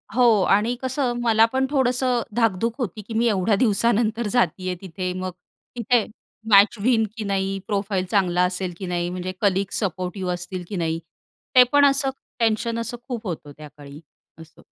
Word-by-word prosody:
हो 235 -5 +5
आणि 215 +5 +2
कसं 260 -1 -1
मला 225 -1 +5
पण 265 0 +2
थोडंसं 255 -3 +1
धाकधूक 225 -1 +1
होती, 215 -4 -4
की 220 +3 -9
मी 230 +2 +2
एवढ्या 205 -1 +2
दिवसानंतर 225 0 +1
जातीय 185 -5 0
तिथे, 185 -1 -4
मग 185 0 -4 0.4
तिथे 235 -1 +2 0.4
मॅच 200 +2 +6
होईन 225 +1 +2
की 220 - -3
नाही? 195 -1 -1
प्रोफाइल 200 -2 -1
चांगला 180 -3 +2
असेल 180 0 -3
की 190 - -6
नाही? 175 -1 -2
म्हणजे 180 +1 -4
कलीग 195 -1 +1
सपोर्टिव्ह 185 -1 -2
असतील 180 +1 -6
की 205 - -5
नाही, 165 -2 -1 0.6
ते 255 - +10
पण 285 0 +5
असं 275 0 +3 0.3
टेन्शन 230 0 0 0.3
खूप 235 -5 -5
होतं 155 -4 -6
त्याकाळी, 145 -1 -12 0.4
असं. 160 -1 -16
205 Hz, 160 wpm, -23 LUFS, 185-235 Hz, 0.6 s, ते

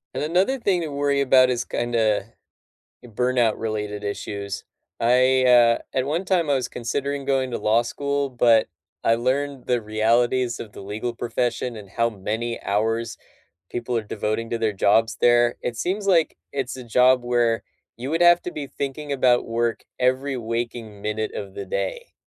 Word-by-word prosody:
And - - -2
another 185 - +2
thing 200 -7 +1
to 165 - -3
worry 140 -1 0
about 130 -2 +5
is, 120 -2 -1
kinda, 110 -4 0 0.8
burnout 120 -1 +1
related 105 -2 -4
issue, 100 0 -4 0.5
I, 130 +2 +4
uh, 120 -2 +6 0.2
at 130 - +1
one 160 +7 -1
time, 175 -5 +1
I - - +4
was 130 -2 0
considering 140 +4 -3
going 135 -2 0
to - - -2
law 110 +2 +3
school, 140 +3 -2
but 120 -3 +4 0.4
I 115 - +4
learned 130 +3 -1
the 125 -1 +2
realities 115 +3 +1
of 105 - -8
the - - -10
legal 105 +4 -4
profession 120 0 -2
and 100 -3 -11
how 115 +2 +1
many 110 +3 -4
hours 115 +3 -1 0.5
people 120 0 -3
are 115 - 0
devoting 110 +2 -3
to 115 - -1
their 110 -2 0
jobs 110 +3 +2
there, 120 0 +4
it 120 - -3
seems 195 - -2
like 170 -4 +3 0.2
it's 135 -2 -3
a 130 - -8
job 125 +2 +4
where 120 -2 +1 0.3
you 125 +4 -5
would 165 +2 0
have 175 0 +6
to - - -4
be 150 -4 -6
thinking 140 +2 -5
about 125 -3 +3
work 115 0 -1 0.2
every 130 +2 +1
waking 115 -2 -4
minute 105 +1 -2
of 100 -2 -6
the 100 - -5
day, 95 0 -4
120 Hz, 170 wpm, -23 LUFS, 115-135 Hz, 0.8 s, uh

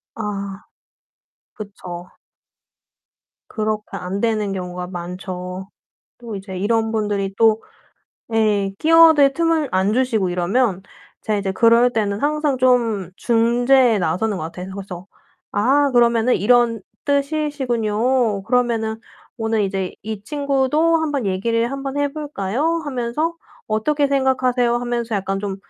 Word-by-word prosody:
아 200 -2 -5 0.9
그쵸. 180 -4 -9 1.4
그렇게 215 -1 -3
안 190 +3 -4
되는 215 -3 0
경우가 180 -1 -5
많죠. 180 +1 -6 0.5
또 235 -3 -7
이제 190 -1 -7
이런 225 +3 0
분들이 205 -3 -1
또 225 -1 +4 0.7
예 210 -3 +2
끼어들 320 -4 +6
틈을 330 -3 +1
안 190 +2 +2
주시고 225 -6 +1
이러면 190 +3 0 0.4
제가 215 -1 -1
이제 195 -1 -2
그럴 230 +4 +4
때는 210 -3 -1
항상 300 -1 0
좀 235 -7 +2
중재에 240 +1 +3
나서는 185 +4 -1
것 155 - -4
같아요. 180 +3 -7
그래서 190 -2 -8 0.4
"아 275 +7 +2
그러면은 235 -1 +3
이런 235 +2 +3 0.2
뜻이시군요. 260 -7 0
그러면은 230 -2 0 0.4
오늘 225 -2 0
이제 190 -1 -3
이 215 -1 -6
친구도 285 +4 +1
한번 290 -7 -1
얘기를 230 +5 0
한번 275 0 -4
해 285 0 +1
볼까요?" 295 - -2
하면서 285 +4 -2 0.3
"어떻게 285 +7 +1
생각하세요?" 255 -3 +1
하면서 240 -1 -2
약간 195 -1 -1
좀 195 -1 -4
225 Hz, 260 characters per minute, -20 LUFS, 200-260 Hz, 1.4 s, 끼어들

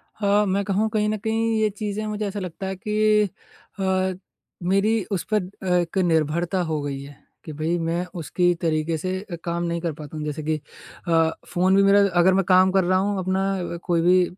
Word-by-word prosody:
हाँ। 205 0 +2
मैं 200 +1 0
कहूँ 205 +3 +1
कहीं 210 -1 0
न 215 - -1
कहीं 225 +1 0
ये 215 - +3
चीज़ें 210 +1 -4
मुझे 210 0 -2
ऐसा 200 +1 -4
लगता 185 0 -5
है 190 - -3
कि 210 +2 +2 0.6
अ, 190 0 +1 0.5
मेरी 195 +4 +2
उस 190 -4 -1
पर 210 -3 +3 0.2
अ, - - -5
एक 175 +1 0
निर्भरता 170 +1 +1
हो 155 -2 -1
गई 140 -1 -4
है, 140 +1 -11 0.3
कि 155 - -7
भई 160 +3 -1
मैं 170 +2 -1
उसके 175 +3 +1
तरीके 160 0 0
से 185 +4 -3 0.2
काम 170 0 -2
नहीं 170 0 -2
कर 165 -2 -2
पाता 150 +1 -8
हूँ। 150 - -4
जैसे 150 +1 -4
कि 155 +1 0 0.5
अ, 165 -1 +4 0.2
फ़ोन 185 +2 +2
भी 200 - +5
मेरा 200 +1 +6 0.2
अग़र 185 +2 +5
मैं 195 +1 +3
काम 185 0 +5
कर 190 0 +3
रहा 185 +1 +2
हूँ 200 +1 0
अपना 185 -1 -1
कोई 170 -1 +1
भी 180 +2 +5
185 Hz, 205 wpm, -23 LUFS, 170-200 Hz, 0.6 s, मेरा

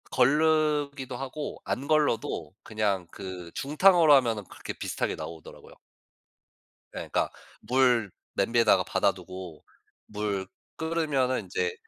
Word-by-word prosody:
거르기도 145 -1 +2
하고 135 +3 -5
안 135 +3 -3
걸러도 115 - +1
그냥 105 -5 -1
그 90 -3 -8
중탕으로 160 +2 +5
하면은 115 -6 +2
그렇게 - - -8
비슷하게 - - -3
나오더라고요. 80 -1 -10 1.2
예 - - -5
그러니까 - - 0 0.3
물 125 -5 +2 0.2
냄비에다가 115 +1 +3
받아 - - +2
두고 90 -4 -10 0.4
물 105 -2 -2 0.3
끓으면은 150 -6 0
인제 455 +1 -2
130 Hz, 280 characters per minute, -28 LUFS, 105-150 Hz, 1.2 s, 중탕으로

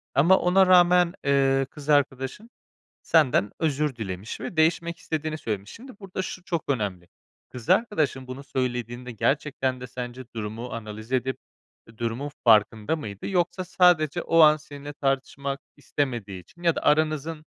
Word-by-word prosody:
Ama 170 +7 +6
ona 185 +2 +4
rağmen, 180 -1 +5
eee, 135 -1 +3
kız 150 -1 -10
arkadaşın 145 - 0 0.5
senden 130 -10 +3
özür 150 -3 0
dilemiş 100 -2 -6
ve 170 - -6
değişmek 165 +1 +2
istediğini 155 -2 -3
söylemiş. 105 -7 -4
Şimdi, 250 -2 -12
burada 190 -2 -5
şu 185 -1 -6
çok 170 -3 -2
önemli, 100 -10 -2 0.4
kız 120 -3 -9
arkadaşın 155 - +1
bunu 130 +2 -7
söylediğinde 125 -2 -3
gerçekten 130 +1 -1
de 125 - -6
sence 125 +1 -7
durumu 110 +3 -5
analiz 110 0 -8
edip 130 0 0 0.6
durumun 120 +5 -3 0.2
farkında 110 +4 +4
mıydı? 105 -10 -7
Yoksa, 180 0 0
sadece 175 -3 +3
o 165 - +2
an 155 -1 +8
seninle 145 -1 -10
tartışmak 135 0 -2 0.2
istemediği 120 -10 -3
için 170 - -19
ya 170 -2 +3
da - - -3
aranızın 155 +1 +1
140 Hz, 145 wpm, -25 LUFS, 120-160 Hz, 0.6 s, an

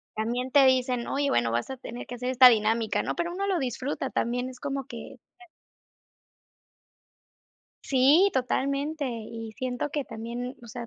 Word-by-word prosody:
también 240 +4 -2
te 280 0 +6
dicen: 255 -2 +2
"Oye, 280 0 0
bueno, 120 -1 +1
vas 120 +1 -1
a 265 - -5
tener 245 -1 -8
que 245 - -6
hacer 250 +1 -3
esta 255 0 +8
dinámica", 220 -1 +1
¿no? - - -3
Pero 345 0 -2
uno 395 +3 -3
lo 385 -2 +1
disfruta 265 +1 -3
también, 245 +1 -1
es 255 -1 -12
como 275 -1 -3
que - - -9 2.7
Sí, 285 +9 +4
totalmente. 280 +3 -1
Y 225 -1 -7
siento 255 +4 -3
que 290 -1 -2
también, 240 +3 -6
o - - -11
sea, 240 0 -7
255 Hz, 160 wpm, -27 LUFS, 235-275 Hz, 2.7 s, esta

